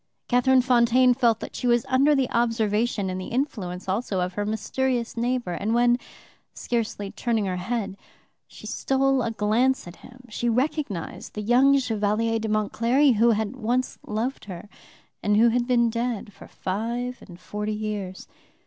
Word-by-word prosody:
Catherine 255 +1 +4
Fontaine 250 0 +4
felt 235 -3 +2
that - - -7
she 250 - -2
was 240 0 +3
under 275 +3 +4
the 270 -2 +1
observation 225 -2 0
and 185 0 -3
the - - -6
influence 200 -9 -3
also 195 0 -1
of 180 0 -1
her 205 +2 -2
mysterious 240 +3 -1
neighbor, 240 -3 -1
and 210 +6 -1
when, 240 +1 +3 0.6
scarcely 225 -4 -3
turning 225 -4 -1
her 185 -1 -2
head, 200 +1 -3 0.5
she - - -13
stole 270 0 +1
a 230 - -1
glance 225 +3 +1
at 175 - -10
him, 255 0 -15
she 235 +2 -2
recognized 250 - -2
the 210 - -4
young 260 +5 +5
Chevalier 225 -2 0
d'Aumont 215 -1 -1
Cléry, 250 +2 +3
who 235 +2 +5
had 220 +1 0
once 250 +1 -1
loved 230 +6 -3
her, 185 0 -8 0.5
and 210 0 +2
who 235 +2 +6
had 240 +1 0
been 235 -2 +3
dead 230 -3 -3
for - - -13
five 235 +6 -4
and 175 -2 -13
forty 210 +1 -4
years. 210 -3 -5
230 Hz, 165 wpm, -25 LUFS, 210-250 Hz, 0.6 s, who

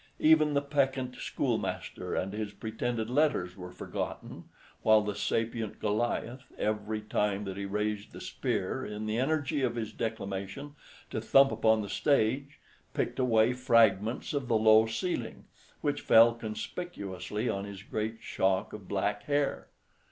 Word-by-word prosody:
Even 155 -1 +5
the 140 - +2
peccant 135 -3 0
schoolmaster - - -2
and 95 +2 -2
his 105 -1 -4
pretended 110 +1 -3
letters 125 -9 +1
were 90 -2 -8
forgotten, - - -6 0.4
while 110 -1 +5
the 105 0 -2
sapient 115 0 -2
Goliath, 120 +4 -2
every 105 0 -1
time 105 -1 0
that 95 -2 -5
he 100 0 -4
raised 105 +1 -2
the - - -9
spear, - - -2
in 105 +1 -5
the 110 +2 -1
energy 145 +1 0
of 120 -3 0
his 110 -3 -4
declamation, 110 +5 -4 0.4
to 110 - -2
thump 135 +4 +5
upon 110 0 +3
the - - -5
stage, 140 +4 +1 0.4
picked - - -1
away 120 -2 +4
fragments 115 -2 +3
of 140 -4 -2
the 115 -2 +3
low 110 0 +6
ceiling, 115 +1 -3 0.4
which - - -1
fell 115 +1 +7
conspicuously 110 - -5
on 100 -3 -1
his 100 -1 -9
great 110 +2 -3
shock 95 +2 0
of 105 -3 -9
black 100 +1 -1
hair. 145 -1 0
110 Hz, 145 wpm, -30 LUFS, 105-125 Hz, 0.4 s, fell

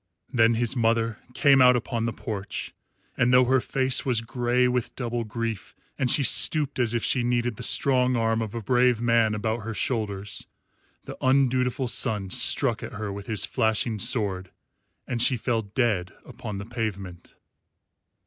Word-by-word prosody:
Then 115 -1 +3
his 120 +2 -1
mother 115 -2 0 0.2
came 140 -2 +4
out 125 0 +6
upon 115 -1 -3
the 115 - -2
porch, 105 -3 -7 0.4
and 125 -1 +1
though 125 0 +5
her 130 +1 +2
face 130 0 0
was 125 -4 0
grey 120 +1 0
with 125 -1 -3
double 120 -2 -4
grief 115 -3 -6 0.2
and 130 - -2
she 140 - +2
stooped 145 +2 +4
as 120 -1 0
if 115 - -2
she 125 - +1
needed 120 -1 -1
the - - -10
strong 125 0 +3
arm 115 0 0
of 110 0 -6
a 115 - -5
brave 125 +1 +2
man 115 -2 +1
about 110 +2 -3
her 110 +1 -7
shoulders, 105 -5 -3 0.6
the - - -11
undutiful 130 -1 +1
son 105 -6 +1
struck - - +5
at - - -8
her 105 -1 -6
with 100 0 -9
his 110 -3 +1
flashing 110 0 -1
sword 95 -5 -1 0.6
and 120 -2 -3
she 125 0 +2
fell 115 0 -2
dead 100 -4 -2
upon 105 -2 -8
the 100 - -7
pavement. 100 -7 -7
115 Hz, 170 wpm, -24 LUFS, 110-125 Hz, 0.6 s, out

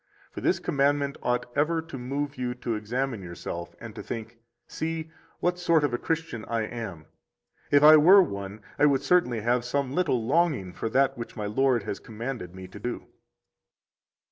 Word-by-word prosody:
50 - - -41
For - - -6
this - - +2
commandment 140 0 +1
ought 125 0 0
ever 160 +3 +2
to 165 -2 -8
move 140 +3 -3
you 125 -1 -3
to 125 -2 -3
examine 115 +2 -2
yourself 85 -1 -7
and 115 -2 -9
to - - -7
think: 115 0 -7 0.3
See, 160 0 -4 0.3
what 180 0 +1
sort 170 -3 +3
of 145 -4 +1
a 120 - 0
Christian 160 -8 -3
I 115 -1 -1
am! 105 -9 -6 0.6
If 145 0 +5
I 155 +1 +10
were 185 +6 +8
one, 100 - -6 0.2
I 150 - +6
would 140 -1 +2
certainly 125 -11 +2
have 120 +2 +1
some 135 +1 -1
little 145 -9 +1
longing 140 - +1
for 115 - -3
that 135 +1 +2
which 115 - -7
my 105 - -4
Lord 125 +2 +2
has - - -4
commanded 110 -5 -6
[me] 95 0 -8
to 100 - -11
do. 120 +4 -5
125 Hz, 185 wpm, -27 LUFS, 110-145 Hz, 0.6 s, I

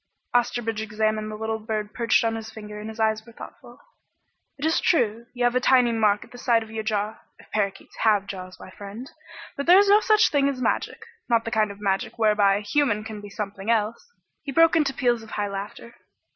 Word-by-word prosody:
Osterbridge 235 -2 0
examined 215 0 -1
the 215 - -6
little 220 +1 -3
bird 215 -1 -4
perched 235 -1 +2
on 225 0 0
his 220 -1 -6
finger 210 -1 -9
and 215 +1 -7
his 220 +1 -10
eyes 220 0 +1
were 235 - -15
thoughtful. - - -12 0.8
"It 285 - -4
is 320 +1 +2
true, 235 - +1
you 245 - -1
have 245 0 +3
a 255 - +2
tiny 250 -1 +4
mark 210 -2 +2
at - - -18
the 245 - -11
side 235 -2 +2
of 220 - -13
your 220 0 -3
jaw 215 -1 -2 0.2
if - - -20
parakeets 200 -2 -3
have 210 -3 +2
jaws, 185 -2 -8
my - - -11
friend. 205 +7 -9 0.4
But 280 - -4
there 355 +2 +8
is 400 0 +5
no 410 +1 +7
such 430 0 +3
thing 280 -1 +3
as 270 -2 -4
magic. 255 - -2 0.2
Not 230 -1 +2
the 230 - -4
kind 215 -2 +2
of 200 0 -10
magic 195 +1 -1
whereby 210 -3 +3
a 205 - -2
human 215 -1 +1
can 215 -1 -8
be 205 - -10
something 200 0 -6
else!" 230 - -1 0.3
He 280 - -6
broke 330 +4 +5
into 300 -4 +2
peals 240 -3 0
of 220 - -13
high 205 -2 -2
laughter. 200 +4 -7
220 Hz, 225 wpm, -24 LUFS, 210-245 Hz, 0.8 s, there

